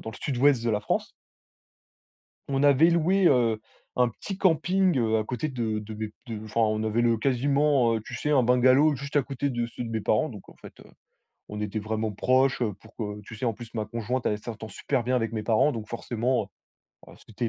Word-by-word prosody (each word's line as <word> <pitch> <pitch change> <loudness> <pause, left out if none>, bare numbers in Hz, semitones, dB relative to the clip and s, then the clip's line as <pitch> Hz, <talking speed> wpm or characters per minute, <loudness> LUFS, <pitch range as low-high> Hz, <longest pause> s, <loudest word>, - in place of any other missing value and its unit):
dans 110 - -6
le - - -11
Sud-Ouest 135 -2 +2
de 115 - +1
la 105 -1 0
France. - - -2 1.4
On 135 0 +1
avait 145 +4 +6
loué, 180 +3 +2
heu, 120 -6 +3 0.4
un 125 -1 +3
petit 190 - -7
camping, 185 -1 +2
heu, 110 -2 +2
à 110 - 0
côté 125 +5 -3
de 115 -6 -2
de 105 +1 -8
mes 110 0 -5 0.2
de 110 -2 -6
enfin 110 +1 -3
on 110 0 +1
avait 110 +2 +1
le 115 -1 +3
quasiment, 135 0 +2
heu, 110 - -3
tu 130 - -7
sais, 150 +5 -2
un 135 -4 +4
bungalow 130 +5 +4
juste 140 +2 -8
à 145 - +4
côté 140 +1 -3
de 120 -2 -1
ceux 115 +1 -7
de - - -6
mes 110 -2 -2
parents. 110 +8 +1
Donc 105 -7 -11
en - - -16
fait, - - -14
heu, - - -16 0.6
on 105 0 -6
était 105 +1 -3
vraiment 110 0 -2
proches, 130 +5 +2
heu, 110 -3 0
pour 110 +1 -18
que 105 -2 -5
tu 105 - -11
sais, 120 - -5
en 115 - +1
plus, 115 +1 -11
ma 110 - -2
conjointe 115 +4 -3
elle - - +1
est 105 0 -5
s'entend 110 -2 -7
super 120 +5 -2
bien 125 +2 0
avec 115 -2 -1
mes 110 -2 -3
parents. 115 +6 +3
Donc 110 -2 -6
forcément, 120 +2 -1 0.6
heu - - -13
heu, - - -16
c'était 115 +2 -3
120 Hz, 235 wpm, -26 LUFS, 110-135 Hz, 1.4 s, avait